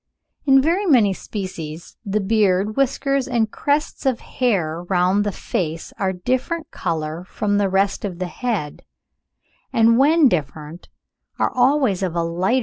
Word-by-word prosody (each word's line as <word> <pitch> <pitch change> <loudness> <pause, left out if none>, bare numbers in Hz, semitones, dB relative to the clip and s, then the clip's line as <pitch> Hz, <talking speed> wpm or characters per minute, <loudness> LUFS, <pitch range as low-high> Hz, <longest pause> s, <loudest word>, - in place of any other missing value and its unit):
In 270 -1 +6
very 360 +6 +1
many 230 - +4
species, 175 -6 -7
the 210 0 -1
beard, 205 0 +1
whiskers, 275 0 0
and 230 -4 0
crests 290 +1 -1
of 265 -4 +1
hair 175 -10 -1
round 185 +2 +2
the 205 - -1
face 165 -3 -4
are 195 - +1
of 190 - -3
a - - -13
different 260 - -2
colour 160 -1 -3
from 205 +2 -1
the 200 -1 +1
rest 195 +1 +1
of 190 -4 -4
the 185 - -3
head, 185 - -3 0.9
and 230 +1 +4
when 305 +2 +5
different, 155 - -4 0.5
are - - +1
always 255 -6 +2
of 180 -3 -2
a 170 - +1
lighter 165 - -2
tint 185 +8 0
(45. - - +3
205 Hz, 165 wpm, -21 LUFS, 180-255 Hz, 0.9 s, In